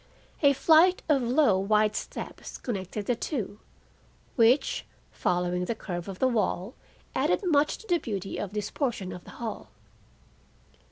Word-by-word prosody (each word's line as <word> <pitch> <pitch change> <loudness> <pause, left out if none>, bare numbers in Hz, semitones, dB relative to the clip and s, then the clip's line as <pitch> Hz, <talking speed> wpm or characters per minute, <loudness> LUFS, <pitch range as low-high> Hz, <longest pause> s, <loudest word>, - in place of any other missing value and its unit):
A 285 -2 +6
flight 330 +6 +5
of 290 -4 +3
low, 245 -4 +3
wide 210 +2 +2
steps - - -6
connected 200 -2 -4
the 245 - +1
two, 225 - -4 0.8
which, 245 +4 +3 0.3
following 180 0 0
the 230 - -2
curve 175 -4 -5
of 195 -2 -6
the 260 - +3
wall, 220 -3 0 0.4
added - - +1
much 300 -5 +2
to 445 - -15
the 350 -3 +2
beauty 195 - -4
of 205 -1 -4
this 210 -1 -3
portion 235 -10 -2
of 180 - -10
the - - -12
hall. 230 -2 -5
225 Hz, 150 wpm, -28 LUFS, 195-280 Hz, 0.8 s, A